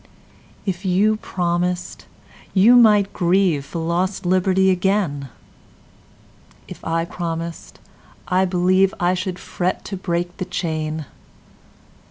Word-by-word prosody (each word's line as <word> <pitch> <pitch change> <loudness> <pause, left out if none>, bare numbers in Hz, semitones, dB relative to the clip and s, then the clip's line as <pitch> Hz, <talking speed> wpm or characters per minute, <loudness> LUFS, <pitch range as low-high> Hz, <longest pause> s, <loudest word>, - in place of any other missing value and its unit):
If 190 -1 -3
you 200 +3 +2
promised, 180 -2 -2 0.5
you 215 +6 +6
might 210 -4 +5
grieveFor 170 -4 +1
lost 185 +3 -1
liberty 185 +1 +3
again:If 180 - -6
I 165 0 -1
promised, 170 -1 -5 0.5
I 185 +1 +2
believeI 185 0 +2
should 185 0 -3
fret 180 0 -3
to 195 - -5
break 175 -1 -3
the 185 - -3
chain. 155 -3 -3
180 Hz, 95 wpm, -21 LUFS, 170-190 Hz, 0.5 s, you